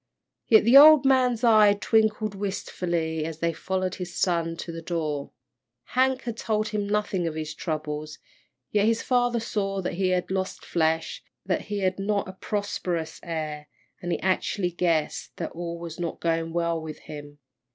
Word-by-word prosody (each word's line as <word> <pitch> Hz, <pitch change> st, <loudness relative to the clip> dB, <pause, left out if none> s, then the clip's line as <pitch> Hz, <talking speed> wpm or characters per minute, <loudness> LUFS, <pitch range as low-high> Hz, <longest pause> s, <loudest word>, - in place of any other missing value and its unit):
Yet 220 Hz, -2 st, +6 dB
the 235 Hz, +5 st, +7 dB
old 300 Hz, -1 st, +9 dB
man's 255 Hz, -3 st, +3 dB
eyes 215 Hz, -3 st, +6 dB
twinkled 215 Hz, -1 st, +2 dB
wistfully 175 Hz, -5 st, -2 dB
as 160 Hz, 0 st, -5 dB
they 165 Hz, +1 st, 0 dB
followed 185 Hz, +2 st, -2 dB
his 175 Hz, -1 st, -6 dB
son 165 Hz, -2 st, 0 dB
to 170 Hz, -, -6 dB
the 165 Hz, 0 st, -7 dB
door. 155 Hz, -4 st, -3 dB, 0.6 s
Hank 260 Hz, +1 st, +2 dB
had 235 Hz, -2 st, -4 dB
told 215 Hz, -1 st, -1 dB
him 210 Hz, -1 st, -2 dB
nothing 205 Hz, -4 st, 0 dB
of 160 Hz, -, -4 dB
his 155 Hz, -1 st, -4 dB
troubles, 155 Hz, -2 st, -4 dB, 0.5 s
yet 210 Hz, 0 st, +3 dB
his 230 Hz, 0 st, +1 dB
father 245 Hz, -2 st, +2 dB
saw 195 Hz, -3 st, -2 dB
that -, -, -2 dB
he 185 Hz, +1 st, 0 dB
had 180 Hz, 0 st, 0 dB
lost 190 Hz, 0 st, -3 dB
flesh, 160 Hz, -1 st, 0 dB, 0.2 s
that -, -, -1 dB
he 205 Hz, -1 st, -3 dB
had 185 Hz, 0 st, 0 dB
not 200 Hz, 0 st, 0 dB
a 190 Hz, -, -7 dB
prosperous 185 Hz, -5 st, -3 dB
air, 155 Hz, -3 st, -5 dB, 0.3 s
and 175 Hz, -, -3 dB
he -, -, +1 dB
acutely 185 Hz, 0 st, 0 dB
guessed 165 Hz, -3 st, -1 dB
that -, -, -4 dB
all 170 Hz, 0 st, -5 dB
was 170 Hz, 0 st, -8 dB
not 170 Hz, -1 st, -3 dB
going 165 Hz, -1 st, -1 dB
well 170 Hz, -1 st, 0 dB
with 155 Hz, -1 st, -7 dB
him. 145 Hz, -1 st, -10 dB
180 Hz, 170 wpm, -26 LUFS, 165-210 Hz, 0.6 s, old